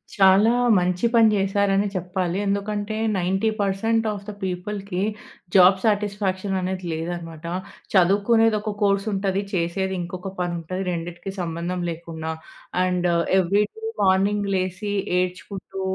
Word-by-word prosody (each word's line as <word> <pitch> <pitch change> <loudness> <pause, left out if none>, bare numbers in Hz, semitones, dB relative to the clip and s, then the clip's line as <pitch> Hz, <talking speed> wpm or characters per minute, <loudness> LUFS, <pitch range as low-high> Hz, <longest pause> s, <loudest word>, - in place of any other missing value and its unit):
చాలా 195 +3 +6 0.3
మంచి 180 +4 +1
పని 225 -2 +6
చేసారని 195 +1 +2
చెప్పాలి. 180 0 -2
ఎందుకంటే, 205 +1 -2 0.2
90 190 +4 +1
పర్సెంట్ 225 +3 +1
ఆఫ్ 200 -1 -6
ది 210 - -5
పీపుల్‌కి 190 +1 -3 0.5
జాబ్ 190 +1 +7
సాటిస్ఫాక్షన్ 200 -2 0
అనేది 185 0 -3
లేదన్నమాట. 165 0 -5 0.5
చదువుకునేది 205 +4 +4
ఒక 215 - -3
కోర్స్ 200 0 +2
ఉంటది, 195 0 0
చేసేది 190 +2 -1
ఇంకొక 180 +2 -6
పని 175 -1 -1
ఉంటది. 185 +4 -4
రెండిటికి 175 +2 -5
సంబంధం 170 +2 -3
లేకుండా. 160 -1 -5 0.5
అండ్ 180 -1 +1 0.3
ఏవ్రీ 195 +3 +3
డే 445 - -11 0.2
మార్నింగ్ 200 +2 +2
లేసి 190 +2 -2 0.3
ఏడ్చుకుంటూ 190 +1 -4
190 Hz, 120 wpm, -23 LUFS, 180-200 Hz, 0.5 s, జాబ్